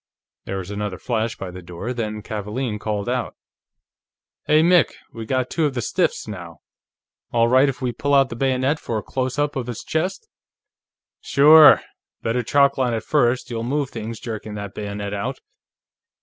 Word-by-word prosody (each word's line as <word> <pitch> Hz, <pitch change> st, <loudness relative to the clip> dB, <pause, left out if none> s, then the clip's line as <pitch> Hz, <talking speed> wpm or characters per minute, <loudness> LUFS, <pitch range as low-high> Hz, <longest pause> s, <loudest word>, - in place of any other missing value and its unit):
There 95 Hz, -, -4 dB
was 95 Hz, +1 st, -6 dB
another 105 Hz, -2 st, -3 dB
flash 115 Hz, 0 st, -2 dB
by 95 Hz, -6 st, -7 dB
the 90 Hz, +1 st, -9 dB
door, 90 Hz, +8 st, -6 dB
then 110 Hz, -3 st, -4 dB
Kavaalen 105 Hz, +2 st, -4 dB
called 105 Hz, -1 st, -3 dB
out: 125 Hz, 0 st, -2 dB, 1.1 s
"Hey, 155 Hz, +1 st, +5 dB
Mick; 175 Hz, 0 st, +4 dB, 0.2 s
we 115 Hz, -2 st, -7 dB
got 130 Hz, 0 st, -1 dB
two 160 Hz, -3 st, +1 dB
of 135 Hz, -, -5 dB
the 120 Hz, -, -1 dB
stiffs, -, -, 0 dB
now. 85 Hz, -6 st, -8 dB, 0.7 s
All 115 Hz, -1 st, +3 dB
right 130 Hz, +3 st, +5 dB
if 130 Hz, 0 st, -5 dB
we 125 Hz, -, 0 dB
pull 145 Hz, +4 st, 0 dB
out 135 Hz, -1 st, +4 dB
the 115 Hz, -, -6 dB
bayonet 135 Hz, +3 st, +1 dB
for 115 Hz, -, -3 dB
a 105 Hz, -, -4 dB
close 130 Hz, 0 st, -3 dB
up 145 Hz, 0 st, 0 dB
of 130 Hz, -3 st, -3 dB
his 120 Hz, -2 st, -6 dB
chest?" 185 Hz, -, -2 dB, 0.9 s
"Sure. 150 Hz, +2 st, +7 dB, 0.4 s
Better 115 Hz, +2 st, 0 dB
chalkline 135 Hz, 0 st, +2 dB
it, 110 Hz, -, -5 dB
first; 125 Hz, -3 st, +1 dB
you'll 115 Hz, -1 st, -3 dB
move 135 Hz, +3 st, -1 dB
things 115 Hz, 0 st, -6 dB
jerking 110 Hz, -2 st, -6 dB
that 100 Hz, -1 st, -6 dB
bayonet 100 Hz, -1 st, -5 dB
out." 100 Hz, -1 st, -3 dB
120 Hz, 175 wpm, -22 LUFS, 105-135 Hz, 1.1 s, Sure